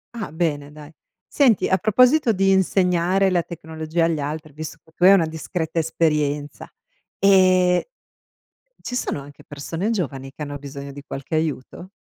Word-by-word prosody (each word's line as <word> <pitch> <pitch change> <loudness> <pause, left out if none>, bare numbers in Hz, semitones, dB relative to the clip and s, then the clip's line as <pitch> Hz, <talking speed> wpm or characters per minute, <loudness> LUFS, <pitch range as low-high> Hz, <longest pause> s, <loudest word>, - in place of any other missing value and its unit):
Ah, 215 -8 -5
bene 150 -4 -2
dai. 150 +1 -13 0.3
Senti, 255 -8 +3
a 190 - +2
proposito 250 +6 +4
di 195 0 +2
insegnare 190 0 +2
la 175 - +2
tecnologia 160 0 -3
agli 165 -2 0
altri, 150 +1 -5
visto 155 +2 -7
che 160 - -24
tu 175 - -4
hai 195 - +9
una 180 -4 +4
discreta 160 +1 -3
esperienza, 150 -3 -1 0.5
e 185 - +4 0.9
ci - - -7
sono 250 - -2
anche 145 +1 -13
persone 165 +7 -4
giovani 135 - -3
che 150 - -8
hanno 145 -1 -6
bisogno 140 0 -8
di 140 +1 -10
qualche 140 +1 -8
aiuto? 160 +2 -3
165 Hz, 155 wpm, -22 LUFS, 145-185 Hz, 0.9 s, hai